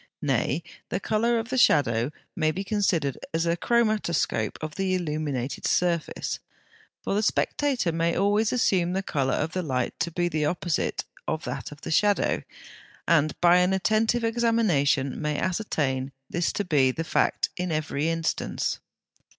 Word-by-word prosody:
Nay, 135 +3 0 0.3
the 185 - -1
colour 230 +3 +1
of 225 +1 -3
the 260 0 0
shadow 120 - +3 0.3
may 155 -2 +2
be 185 +5 -2
considered 185 - 0 0.2
as 165 +1 +1
a 170 0 +2
chromatoscope 210 - +1
of 155 -1 -5
the 190 +1 0
illumined 150 -6 -2 0.2
surface, 170 -3 0 0.6
for - - -1
the 205 - +2
spectator 250 -2 +1
may 165 +1 0
always 205 +2 +2
assume 185 -8 +2
the 190 +1 -1
colour 135 -7 0
of 155 +2 -1
the 185 - -1
light 130 -6 -1
to 170 - 0
be 175 +1 0
the 155 -3 -1
opposite 175 +2 -1 0.2
of 160 0 -2
that - - -5
of 145 - -12
the 165 - -5
shadow, 205 +5 +2 0.7
and 155 -2 +2
by 175 0 +6
an 180 +1 +3
attentive 220 +4 +2
examination 210 - +1
may 150 -1 -1
ascertain 145 -9 -1 0.2
this 175 0 0
to 205 - -2
be 140 -6 +3
the 160 +6 -2
fact - - +1
in 180 -1 -3
every 155 0 -1
instance. 165 -1 -1
170 Hz, 160 wpm, -26 LUFS, 150-200 Hz, 0.7 s, by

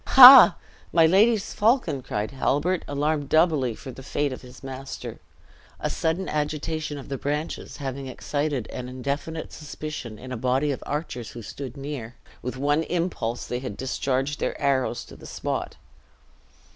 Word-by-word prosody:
"Hah! 255 -6 +11 0.4
my 165 -1 +5
lady's 200 +5 +3
falcon!" 210 - +2
cried 105 -4 -3
Halbert 145 +6 0
alarmed, 145 0 -1
doubly, 155 -8 +3
for 130 - -9
the 130 - -11
fate 140 +1 -1
of - - -8
his 125 +1 -14
master. 135 0 -7 0.6
A - - -2
sudden 165 +3 -1
agitation 150 0 -2
of 140 - -9
the 135 -2 -4
branches 150 +3 -3
having 135 -1 -5
excited 145 -1 -2
an 125 0 -6
indefinite 140 +5 -4
suspicion 150 -6 -7
in 130 +4 -9
a 125 - -3
body 130 +5 +1
of 135 - -4
archers 140 -6 -4
who 120 - -9
stood 130 +3 -7
near, 135 -4 -6 0.3
with 125 +2 -5
one 145 +3 +2
impulse 165 -9 -2
they 125 - -3
had 125 -6 -6
discharged 135 +2 -1
their - - -2
arrows 130 -4 0
to - - -13
the - - -12
spot. - - -3
140 Hz, 160 wpm, -25 LUFS, 130-155 Hz, 0.6 s, Hah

